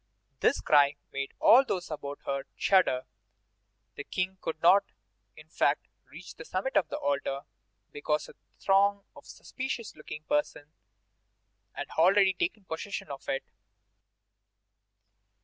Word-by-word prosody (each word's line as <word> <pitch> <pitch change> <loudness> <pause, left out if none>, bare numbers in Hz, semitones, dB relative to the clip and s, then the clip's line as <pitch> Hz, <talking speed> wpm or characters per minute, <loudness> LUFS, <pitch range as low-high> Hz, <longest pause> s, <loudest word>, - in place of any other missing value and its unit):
This - - +2
cry 145 -1 +4 0.2
made 135 0 -4
all 255 +3 +7
those 180 -10 -4
about 145 -2 -6
her 140 0 -2
shudder. 185 -10 +3 0.9
The 145 - -7
King 185 +3 -3
could 160 -1 -4
not, 190 +5 +6 0.5
in 155 - -14
fact, 150 -1 0 0.2
reach 165 +4 -11
the - - -10
summit 190 +11 -3
of 175 - +3
the - - -3
altar, 140 -1 -1 0.5
because 150 +1 -2
a - - -13 0.3
throng 200 +1 +3
of - - -15
suspicious 260 -4 -6
looking 155 0 -9
persons 150 0 -2 1.0
had - - -6
already 190 +3 +5
taken 345 - -3
possession 165 0 -5
of 135 - -8
it. 135 - -1
160 Hz, 130 wpm, -29 LUFS, 145-195 Hz, 1.0 s, all